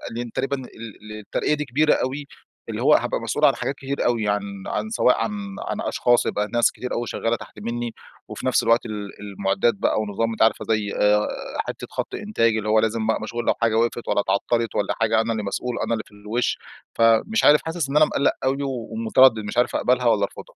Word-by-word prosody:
لإن 120 0 -4
تقريبًا 135 +4 -1
ال 130 - -8 0.5
ال 110 - -7
الترقية 105 +7 -1
دي 150 0 -2
كبيرة 150 +4 +3
أوي، 140 +3 -2 0.4
اللي - - -4
هوّ - - +5
هابقى - - +1
مسؤول - - +1
عن - - +5
حاجات 140 - -3
كتير 140 +1 -3
أوي، 115 -3 +1
عن 100 0 +1 0.3
عن 220 - -2
سواء 170 - +3
عن 115 - -2 0.4
عن - - -3
أشخاص، 120 0 +2
يبقى 105 0 -1
ناس 120 0 +3
كتير 125 - -6
أوي 120 0 -2
شغّالة 115 +1 -1
تحت 110 - -11
مِنّي، 120 +2 -3 0.4
وفي - - -7
نفس - - +2
الوقت 115 +1 +3
ال 105 -3 -5
المعدات 100 +2 0
بقى 110 - 0
ونظام 110 +2 -1
أنتِ 110 - -5
عارفة، 110 - +3
زي، 105 -2 0
آآ، 105 0 +3 0.4
حتّة - - -6
خط - - -4
إنتاج، 115 - +1
اللي 110 0 -3
هوّ 110 +1 +5
لازم 110 0 0 0.2
مشغول 120 +2 -4
لو - - +3
حاجة 115 -1 +2
وقفت 120 +1 0
والَّا - - +2
اتعطَّلت، 115 +4 0
والَّا 100 - 0
حاجة، 110 0 +3
أنا 115 +1 -2
اللي 110 -2 -2
مسؤول، 120 +5 -3
أنا - - -1
اللي 110 -2 -2
في - - -22
الوش. 105 +4 -2 0.4
فمش 115 - +3
عارف 150 +1 +6
حاسس 160 -3 -2
إن 140 - +1
أنا 155 - +7
مقَلَّق 140 - +1
أوي 135 +1 +1
ومتردد، 115 -1 +3
مش 105 +2 -6
عارف 120 - +2
أقبلها، 125 0 +1
والّا 110 -3 +3
أرفضها. - - -12
115 Hz, 215 wpm, -23 LUFS, 110-125 Hz, 0.5 s, أنا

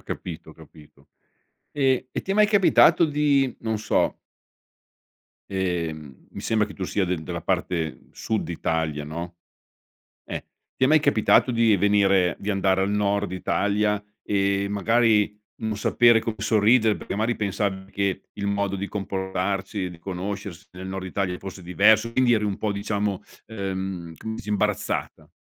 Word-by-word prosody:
Ho - - -22
capito, - - -7
ho - - -13
capito, 75 -2 -18 0.7
ehm, 135 -3 +1
e - - -2
ti 195 - -3
è - - +2
mai 210 0 +5
capitato 200 -4 +5
di, 145 -4 +2
non 110 -1 -2
so 105 - 0 1.3
ehm, 85 -7 -3
mi - - -8
sembra 110 -1 +1
che 100 - -11
tu 95 - -4
sia 95 +1 0
del 90 -3 -2
della - - -5
parte 80 -4 -1
sud 110 -5 -3
Italia, 80 -3 -2
no? 85 +3 -6 0.9
eEh, - - -5 0.3
ti - - +2
è - - +5
mai 155 +2 +5
capitato 110 0 +3
di 115 -3 +3
venire, 100 -3 +3
di 100 - -3
andare 95 -1 +2
al 95 - 0
nord 100 -1 0
Italia, 105 +2 0 0.2
ehm, 100 0 0
magari 105 0 +2 0.2
non 110 -1 -2
sapere 115 +2 +4
come 110 -1 -4
sorridere 110 +1 +3
perché - - -6
magari 110 +4 0
pensavi 100 -2 -2
che 100 -1 -1
il 100 -1 -4
modo 100 -1 0
di 100 +1 -4
comportarsi, 95 0 -3
di 85 -2 -12
conoscersi 95 0 -6
nel 95 +1 -8
nord 95 0 -5
Italia 90 -1 -2
fosse 95 -1 -9
diverso, 110 +6 +3
quindi 125 -1 +4
eri 105 -1 0
un 100 -2 -2
po' 105 -2 -1
diciamo, 100 0 -2 0.2
ehm, 95 -5 -5
com 110 0 -6
s - - -9
imbarazzata? 105 0 -2
100 Hz, 160 wpm, -24 LUFS, 95-110 Hz, 1.3 s, mai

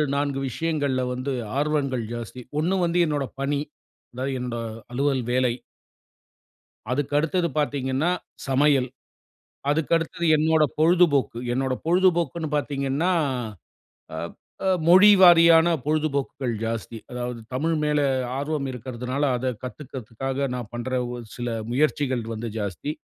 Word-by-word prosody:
4 140 -1 -1
விஷயங்கள்ல 145 -2 -1
வந்து 130 +2 -3 0.3
ஆர்வங்கள் 140 -4 0
ஜாஸ்தி 120 +1 -6 0.2
1 175 +5 +1
வந்து 170 +1 +1
என்னோட 145 -2 -1 0.2
பணி, 140 +1 0 0.5
அதாவது 130 +2 -3
என்னோட 125 -1 -4 0.3
அலுவல் 135 0 0
வேலை. 125 -1 +2 1.4
அதுக்கு 145 +2 -1
அடுத்தது 170 +3 +1
பார்த்தீங்கன்னா, 140 +1 0 0.4
சமையல். 135 -1 +3 0.8
அதுக்கு 150 +2 0
அடுத்தது 170 +1 -4
என்னோட 160 0 +3 0.2
பொழுதுபோக்கு. 160 -7 +3
என்னோட 130 +1 0
பொழுதுபோக்குன்னு 170 -2 +2
பார்த்தீங்கன்னா, 140 +4 -1 1.0
அ - - -4 0.5
அ - - +3 0.2
மொழி 185 +4 +8
வாரியான 170 -2 +7 0.2
பொழுதுபோக்குகள் 140 -4 -1
ஜாஸ்தி. 115 0 -4
அதாவது 125 -1 -4 0.2
தமிழ் 160 +5 0
மேலே 150 -1 +2 0.3
ஆர்வம் 145 0 -2
இருக்கிறதனால, 125 +2 -4
அத 125 +2 -3 0.2
கத்துக்கறதுக்காக 130 +1 -4
நான் 120 -4 -5
பண்ணுற 120 +2 -4 0.2
ஒரு 120 -1 -6
சில 120 - -4 0.2
முயற்சிகள் 130 -2 +1
வந்து 115 +1 -5
ஜாஸ்தி. 105 - -3
140 Hz, 115 wpm, -24 LUFS, 125-155 Hz, 1.4 s, மொழி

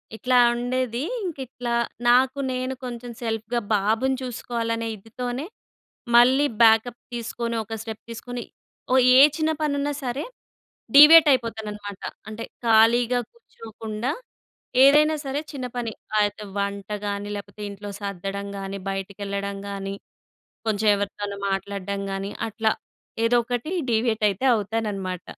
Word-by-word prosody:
ఇట్లా 250 +3 +2 0.2
ఉండేది. 245 0 -2 0.2
ఇంక 340 -5 -4
ఇట్లా 245 -2 -4 0.3
నాకు 260 +3 +4
నేను 255 +1 -2
కొంచెం 240 0 -6
సెల్ఫ్‌గా 225 +1 -2 0.2
బాబుని 220 +6 +1
చూసుకోవాలనే 230 -2 -3
ఇదితోనే 245 +6 -5 0.7
మళ్ళీ 260 +4 +6 0.2
బ్యాకప్ 225 +1 +5
తీసుకొని 235 0 -3
ఒక 225 +1 -8
స్టెప్ 220 -1 -7
తీసుకొని. 245 +1 -6 0.5
ఓ - - +5 0.2
ఏ - - +9 0.2
చిన్న 315 0 +1
పని 300 -2 +1
ఉన్నా 290 +1 -1
సరే! 255 +2 -2 0.7
డీవియేట్ 300 +1 +10
అయిపోతాననమాట. 210 -4 -4 0.3
అంటే 220 +1 -6 0.2
ఖాళీగా 235 +2 +4
కూర్చోకుండా, 225 - -6 0.7
ఏదైనా 300 +3 +6
సరే 275 +2 -2
చిన్న 265 -3 -4
పని. 230 -3 -3 0.3
అయితే 205 +1 -3
వంటగాని 200 +1 -3
లేకపోతే, 200 +1 -10
ఇంట్లో 200 0 -8
సర్దడంగాని 200 0 -5
బయటికెళ్ళడంగాని, 200 0 -4 0.7
కొంచెం 215 0 +1
ఎవరితోనన్న 200 0 -4
మాట్లాడడం 200 0 -3
గాని 195 +1 -4 0.2
అట్లా 220 0 0 0.5
ఏదో 245 +1 +3
ఒకటి 245 +5 -3 0.2
డీవియేట్ 220 -1 +1
అయితే 200 +7 -5
అవుతాననమాట. 200 -4 -3
225 Hz, 115 wpm, -24 LUFS, 200-245 Hz, 0.7 s, డీవియేట్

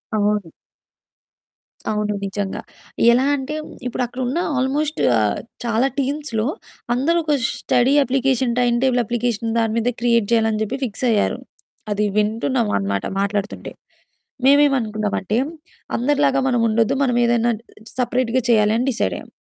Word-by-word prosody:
అవును. 205 -4 0 1.4
అవును 210 -1 -1
నిజంగా. 195 0 -3 0.5
ఎలా 250 +3 +3
అంటే 280 +2 -4 0.3
ఇప్పుడు 250 - -2
అక్కడ 245 +2 -9
ఉన్న 270 +7 -1 0.2
ఆల్‌మోస్ట్ 285 +4 -1 0.2
ఆహ్, 105 -2 +1 0.3
చాలా 235 +3 +2
టీమ్స్‌లో 275 -5 -1 0.5
అందరూ 305 +7 +1
ఒక 300 -2 +2 0.3
study 245 +3 +2
application, 260 -1 +1
time 240 -1 +2
table 250 -2 +3
application 230 -1 -1
దాని 225 -1 0
మీద 235 +2 +1
క్రియేట్ 235 -3 +2
చేయాలని 225 -1 +3
అని 215 0 -2
చెప్పి 245 +5 -3
ఫిక్స్ 235 +2 -4
అయ్యారు. 210 -2 +1 0.5
అది 210 +1 +1
వింటున్నాం 225 +3 +1
అనమాట 100 0 -2
మాట్లాడుతుంటే. 200 +1 -2 0.7
మేమేమనుకున్నామంటే, 225 -8 +2 0.6
అందరిలాగా 275 +2 +2
మనం 245 -2 +1
ఉండొద్దు, 225 0 +2
మనం 250 -3 +1
ఏదైనా 235 0 +2 0.5
సెపరేట్‌గా 250 0 +1
చేయాలి 215 -1 +4
అని 250 +3 -1
డిసైడ్ 235 - -1
అయ్యాం. - - -11
235 Hz, 130 wpm, -20 LUFS, 215-260 Hz, 1.4 s, చేయాలి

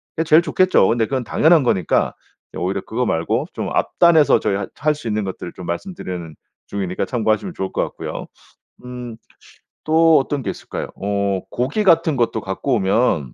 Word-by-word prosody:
그게 160 - 0
제일 160 +1 +6
좋겠죠. 185 - +3
근데 115 -1 +2
그건 130 +1 -2
당연한 160 +6 +4
거니까 95 -9 +1 0.4
오히려 95 +2 -1
그거 125 +3 -2
말고 110 - -1
좀 - - -4
앞단에서 165 -4 +4
저희 100 - 0
할 100 0 -4
할 150 +1 +1
수 145 -5 -8
있는 105 0 -1
것들 90 -2 -6
좀 90 - -9
말씀드리는 85 - -5 0.3
중이니까 95 -3 -3 0.4
참고하시면 185 - -6
좋을 95 - -3
것 - - 0
같고요. - - -6 0.6
음 125 -2 -7 0.7
또 160 0 +5
어떤 140 0 -3
게 - - -3
있을까요? - - -5
어 100 -1 -1
고기 135 - -1
같은 165 -5 +4
것도 115 -2 +1
갖고 95 +8 -1
오면 95 - +1
120 Hz, 355 characters per minute, -20 LUFS, 95-155 Hz, 0.7 s, 제일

